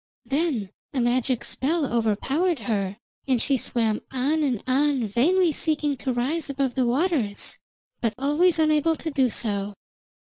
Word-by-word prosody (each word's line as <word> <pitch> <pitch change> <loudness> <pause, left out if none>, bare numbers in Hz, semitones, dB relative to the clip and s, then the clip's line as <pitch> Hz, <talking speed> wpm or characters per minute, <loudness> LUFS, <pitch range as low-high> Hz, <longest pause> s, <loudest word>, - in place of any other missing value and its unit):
Then 270 - -1 0.2
a - - +1
magic 245 0 +1
spell 310 +3 -1
overpowered 265 - 0
her, 200 -4 -2 0.3
and 255 -3 +2
she 275 - +2
swam 225 -3 -1
on 280 +5 0
and 255 -8 0
on 270 -1 +2
vainly 330 - +3
seeking 300 -1 0
to 260 - -2
rise 280 +7 -1
above 270 -2 -1
the 255 -1 +1
waters, 255 - 0 0.4
but 230 -2 0
always 300 +6 +2
unable 310 0 +3
to 320 0 -5
do 265 -3 +2
so. 205 -3 -1
265 Hz, 145 wpm, -25 LUFS, 235-310 Hz, 0.4 s, vainly